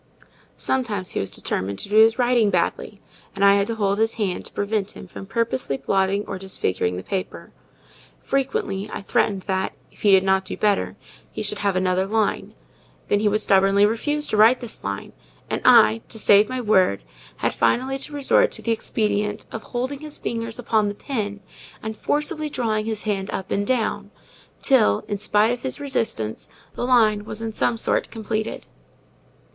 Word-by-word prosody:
Sometimes 215 -8 -1
he - - -2
was 95 - -2
determined 95 +1 -2
to - - -2
do 210 - +2
his 225 +1 +6
writing 240 -4 +3
badly; 195 +2 -1 0.4
and 195 0 +2
I 200 - +7
had 200 0 +2
to 230 - -2
hold 200 -1 0
his 225 0 +1
hand 200 -5 -2
to - - -6
prevent 205 0 -2
him - - -10
from 195 - -10
purposely 230 - -1
blotting 195 +8 0
or 190 - -6
disfiguring 95 - -2
the 90 - -6
paper. 190 0 -5 0.7
Frequently 215 -7 -2
I - - -6
threatened 195 -1 0
that, 190 -1 -2 0.2
if - - -21
he 210 - +3
did 190 -1 +6
not 190 0 +2
do - - -6
better, 205 -2 +1 0.4
he - - -5
should 205 0 -1
have 200 -2 0
another 185 +1 +1
line: 215 0 -1 0.5
then 205 - +3
he 215 - +1
would 210 +1 +2
stubbornly 195 +1 +4
refuse 295 +8 -1
to 215 - 0
write 225 +4 +6
this 240 -3 -6
line; 100 0 -5 0.4
and - - -1
I, 110 +1 +6
to - - -7
save 210 -1 +5
my 255 0 -3
word, 190 - +2 0.3
had - - 0
finally 260 - +1
to 285 - -6
resort 285 -2 +3
to - - -5
the 230 - 0
expedient 210 -1 -1
of 225 - -5
holding 255 +5 -4
his 305 0 -7
fingers 230 -1 -4
upon 220 -3 +1
the 205 - -3
pen, 205 -5 -4 0.4
and 220 0 -4
forcibly 300 +4 -1
drawing 220 -5 -1
his 220 -2 -3
hand 195 -2 -2
up 190 0 -5
and 200 +1 0
down, 215 -5 -1 0.5
till, 230 - +3
in 205 - -3
spite 210 +2 +2
of 245 0 -3
his 265 +2 -3
resistance, 225 - -2 0.2
the 245 - -3
line 215 -5 +4
was 215 0 -7
in 225 0 -4
some 230 +1 0
sort - - 0
completed. 220 -1 -4
210 Hz, 185 wpm, -23 LUFS, 195-230 Hz, 0.7 s, I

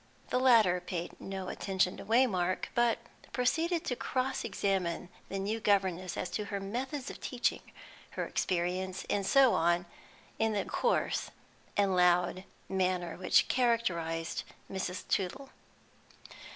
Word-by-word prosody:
The 250 - +3
latter 220 -9 +5
paid 175 -1 -5
no 190 -1 -5
attention 190 -2 0
to - - -8
Waymark, 205 -7 +2
but 240 -1 +3 0.4
proceeded 325 +7 +1
to 250 - -1
cross 260 +2 -1
examine 180 -3 -1 0.2
the 195 - -3
new 205 +4 -1
governess 190 -4 +1
as 180 - -3
to 210 - -2
her 200 0 -3
methods 255 +7 -4
of - - -11
teaching, 245 -2 0 0.6
her - - 0
experience, 185 +1 -1
and 200 - +1
so 265 +4 +5
on, 170 +1 +2 0.5
in 220 0 +2
the 205 - 0
coarse 485 - 0 0.5
and 200 -2 +3
loud 180 +1 +3 0.2
manner 185 -2 0
which 185 - +3
characterised 175 -10 0 0.3
Mrs. 185 -1 -4
Tootle. 205 +9 -1
195 Hz, 130 wpm, -31 LUFS, 180-235 Hz, 0.6 s, latter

